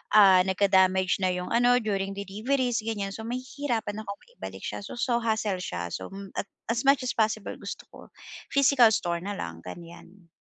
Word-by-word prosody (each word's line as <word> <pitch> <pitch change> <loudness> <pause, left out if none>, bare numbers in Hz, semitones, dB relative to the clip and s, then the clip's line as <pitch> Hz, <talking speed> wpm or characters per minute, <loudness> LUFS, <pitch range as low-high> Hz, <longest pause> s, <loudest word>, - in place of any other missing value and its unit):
ah, 195 -3 +8
nagka-damage 190 0 +3
na 185 - +2
yung 180 0 -5
ano 245 +1 +4
during 195 -2 -2
deliveries, 230 +6 -1
ganyan. 210 -3 -3
So, 220 +2 -7
mahihirapan 245 -4 -3
akong 200 -1 -7
maibalik 485 +1 -10
siya. - - -4
So 205 - -8
so, 240 0 +1
hassle 220 -4 0
siya. 85 - -4
So, - - -5 0.2
at - - -4 0.2
as 255 +4 -1
much 275 -1 +5
as 250 - 0
possible 215 -2 0
gusto - - -7
ko - - -13 0.5
physical 275 -3 +5
store 170 -1 -1
na 200 +3 -5
lang, 85 - -6
ganyan. 170 - -12
205 Hz, 175 wpm, -27 LUFS, 190-240 Hz, 0.5 s, ah